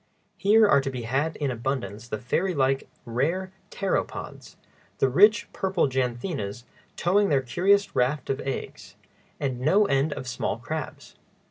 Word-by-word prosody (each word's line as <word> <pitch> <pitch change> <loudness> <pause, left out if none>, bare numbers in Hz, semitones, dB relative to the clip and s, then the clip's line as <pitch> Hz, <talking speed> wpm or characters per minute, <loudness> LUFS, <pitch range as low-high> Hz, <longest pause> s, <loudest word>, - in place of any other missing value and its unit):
Here 210 +4 +5
are 140 -8 +5
to 135 - -3
be 125 -3 -5
had 135 +7 -1
in 145 -3 -1
abundance 120 -3 -4
the 110 - -3
fairy 170 - -1
like, 135 -1 +1 0.2
rare 160 +11 -1 0.2
pteropods, 195 -2 -3 0.4
the - - +3
richly 205 - +5
purple 190 -5 +1
janthinas 125 - -3 0.3
towing 200 +3 +2
their 140 -3 +2
curious 195 +10 +2
rafts 130 +3 +1
of 135 - -2
eggs, 135 - -6 0.4
and 130 -4 -2
no 185 +11 +4
end 140 -1 +1
of 130 - -7
small 125 - -2
crabs. - - -6
135 Hz, 145 wpm, -26 LUFS, 125-185 Hz, 0.4 s, Here